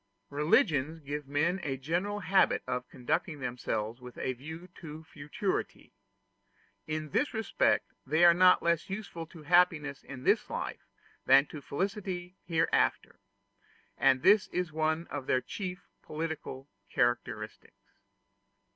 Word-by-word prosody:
Religions 150 - +2
give 145 -1 -5
men 160 +6 +1
a 135 -5 -2
general 180 +9 -2
habit 195 0 +3
of 125 0 -3
conducting 155 +5 -2
themselves 120 -2 -3
with 125 -1 -11
a 130 - -1
view 160 +7 -9
to 160 -1 -9
futurity: 155 +5 -4 0.9
in 155 0 -3
this 290 - 0
respect 220 -2 +1
they 155 +5 +4
are 170 - +9
not 180 +1 +5
less 170 0 +1
useful 190 -5 -5
to 165 -1 -13
happiness 155 -4 +3
in 130 -2 -9
this - - +2
life - - -5 0.4
than 135 +2 +7
to 150 -1 -9
felicity 185 +3 -3
hereafter; 165 -1 +1 0.8
and 130 -1 +3
this 205 0 +6
is 180 -3 -2
one 160 +1 0
of 140 -2 -5
their 130 - +3
chief 180 +5 -6
political 155 -4 -5 0.2
characteristics. 120 0 -2
155 Hz, 130 wpm, -30 LUFS, 140-180 Hz, 0.9 s, are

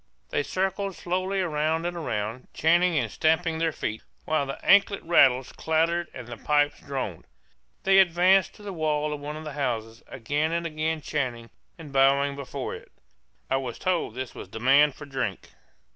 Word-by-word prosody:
They 455 -2 +1
circled 195 - -2
slowly 185 +2 -1
round 160 0 0
and 175 -1 -3
round, 110 +1 -3
chanting 170 +1 +3
and - - 0
stamping 160 +1 +1
their 165 0 +1
feet, 110 -6 -4 0.2
while 155 -3 0
the 135 - -4
anklet 200 0 +5
rattles 130 -6 +4
clattered 165 +2 0
and 125 - -9
the 120 -1 -7
pipes 145 +2 +1
droned. 130 - -5 0.6
They 195 0 +5
advanced 185 +1 +4
to 210 - -15
the 200 -1 -6
wall 150 -2 0
of 150 - -5
one 145 +1 -6
of 155 - -8
the 150 -2 -6
houses, 115 -5 -3
again 145 +6 -2
and 170 0 -1
again 155 0 -2
chanting 125 -6 -3 0.3
and 155 -5 -11
bowing 140 +1 +3
before 140 -2 -5
it; - - -11 0.6
I 135 - +1
was 130 -3 -4
told 175 -11 -1
this 130 -1 -5
was - - -9
a - - -28
demand 135 +5 +4
for 150 - -10
drink. 130 -9 -4
150 Hz, 175 wpm, -26 LUFS, 135-170 Hz, 0.6 s, anklet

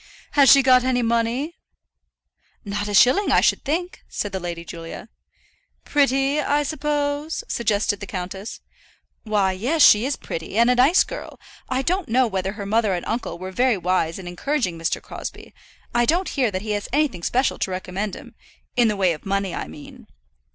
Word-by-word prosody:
"Has 275 -5 +6
she 275 - +7
got 255 -1 +5
any 250 -1 +1
money?" 235 +7 -1 1.1
"Not 205 0 -3
a 205 - -4
shilling, 255 - +5
I - - +5
should - - +2
think," 350 +5 -3
said 205 - -4
the 190 - -3
Lady 170 -1 -6
Julia. 165 +6 -9 0.8
"Pretty, 275 0 +2
I 290 +1 +1
suppose?" 290 +1 -2
suggested 205 -3 0
the 200 - -7
countess. 190 +3 -6 0.6
"Why, 205 -3 +1
yes; 255 - +1
she 210 +1 +7
is 280 - -1
pretty 165 +5 -6
and 235 +2 +5
a - - +3
nice 270 +9 +5
girl. - - -8 0.3
I 260 +1 0
don't 360 -1 -1
know 255 +3 +3
whether 195 -3 -2
her 205 -1 -7
mother 215 -1 +1
and 175 - -5
uncle 225 -7 -3
were 185 +1 -7
very 245 +2 +2
wise 180 -2 0
in 190 -2 -9
encouraging 185 - -2
Mr. 165 0 -2
Crosbie. - - -8 0.4
I 240 0 +3
don't 350 +7 +1
hear 260 -5 +1
that 190 -1 -4
he 215 - -3
has 205 -1 -3
anything 280 - 0
special 255 +9 0
to - - -1
recommend 185 +2 -4
him, - - -12 0.4
in 240 -2 +4
the 210 -2 0
way 185 -3 +2
of 150 - -10
money 195 -2 -1
I - - -4
mean." 145 - -12
225 Hz, 185 wpm, -22 LUFS, 190-275 Hz, 1.1 s, she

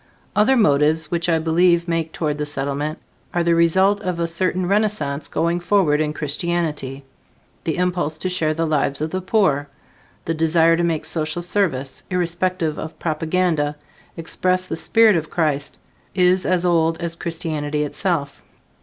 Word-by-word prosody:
Other 220 +6 +4
motives 155 -4 +2
which 170 0 0
I 165 - +3
believe 170 +2 +2
make 165 -1 -1
toward 150 -3 -2
the 150 - -1
Settlement 145 +2 -3 0.4
are 175 - +2
the 170 0 +3
result 190 +5 +3
of 180 -2 -3
a 170 - +1
certain 180 +2 -1
renaissance 195 -8 0
going 170 +1 0
forward 175 -5 +2
in 150 -1 0
Christianity. 150 -3 -2 0.6
The 160 - -1
impulse 180 -4 -1
to 185 - -3
share 165 -4 0
the 165 +1 0
lives 145 -3 +1
of 155 +1 -2
the 185 - -2
poor, 175 -8 +1 0.6
the 165 - 0
desire 165 +1 +3
to 175 - 0
make 165 -3 -1
social 160 +1 -2
service, 160 -8 -1
irrespective 175 -2 -1
of 160 - -7
propaganda, 160 -2 0 0.4
express 185 +2 -1
the - - -4
spirit 220 +4 +4
of 155 -2 -2
Christ, 150 -4 -1 0.4
is 185 0 +3
as 180 -1 +1
old 165 -2 +2
as 170 -1 -3
Christianity 155 -3 -2
itself. 150 -2 -2
165 Hz, 155 wpm, -21 LUFS, 155-180 Hz, 0.6 s, Other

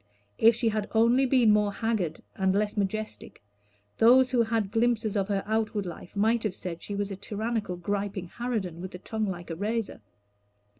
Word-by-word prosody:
If 230 0 +6
she 235 0 +1
had 215 -1 -2
only 235 +4 +4
been 245 -4 +5
more 210 -1 +2
haggard 200 -7 -2
and 190 0 +1
less 210 0 0
majestic, 215 - -4 0.6
those 255 +3 +6
who 245 -2 +3
had 220 -3 0
glimpses 225 -2 +1
of 195 -2 +1
her 200 -2 -1
outward 215 -2 -1
life 175 +1 -9
might 220 +3 +2
have 210 -4 -2
said 170 -3 -6
she 205 - -5
was 200 0 -2
a - - -3
tyrannical, 210 0 -3
griping 200 +1 -3
harridan, 205 -6 -3
with 185 0 -7
a - - -5
tongue 220 +3 -3
like 175 -2 -5
a - - -3
razor. 215 - -3
210 Hz, 185 wpm, -28 LUFS, 195-225 Hz, 0.6 s, If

